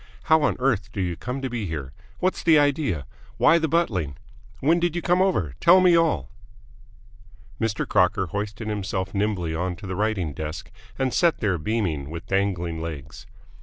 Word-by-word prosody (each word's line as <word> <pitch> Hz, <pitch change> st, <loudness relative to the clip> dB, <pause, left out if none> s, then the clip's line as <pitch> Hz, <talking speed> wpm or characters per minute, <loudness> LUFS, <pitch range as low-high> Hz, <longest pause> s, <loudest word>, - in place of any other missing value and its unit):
How 160 Hz, 0 st, +4 dB
on -, -, +2 dB
earth 115 Hz, -6 st, 0 dB
do 105 Hz, -, -6 dB
you 90 Hz, -2 st, -1 dB
come 125 Hz, +9 st, -5 dB
to -, -, 0 dB
be 115 Hz, -5 st, -3 dB
here? 75 Hz, -4 st, -5 dB, 0.2 s
What's 185 Hz, +1 st, 0 dB
the 165 Hz, -3 st, +5 dB
idea? 140 Hz, -, +1 dB, 0.3 s
Why 170 Hz, -, +5 dB
the 160 Hz, -, 0 dB
buttling? 100 Hz, -, 0 dB, 0.4 s
When 165 Hz, +5 st, +3 dB
did 175 Hz, -1 st, 0 dB
you 175 Hz, -, -1 dB
come 180 Hz, +1 st, +3 dB
over? 135 Hz, -, +1 dB
Tell 175 Hz, +2 st, +7 dB
me 180 Hz, -2 st, +5 dB
all!" 155 Hz, -, +1 dB, 1.3 s
Mr. 110 Hz, -2 st, -1 dB
Crocker 90 Hz, 0 st, +2 dB
hoisted 105 Hz, +4 st, -4 dB
himself 95 Hz, -3 st, -3 dB
nimbly 100 Hz, -5 st, -1 dB
onto 90 Hz, +2 st, -3 dB
the 95 Hz, -1 st, -4 dB
writing 100 Hz, -6 st, -1 dB
desk, 80 Hz, +2 st, -6 dB, 0.3 s
and 130 Hz, -2 st, 0 dB
sat 170 Hz, -2 st, +3 dB
there, 95 Hz, -5 st, 0 dB
beaming, 80 Hz, -7 st, -2 dB
with 85 Hz, +1 st, -7 dB
dangling 90 Hz, -4 st, -1 dB
legs. 80 Hz, -5 st, -7 dB
105 Hz, 170 wpm, -24 LUFS, -, 1.3 s, Tell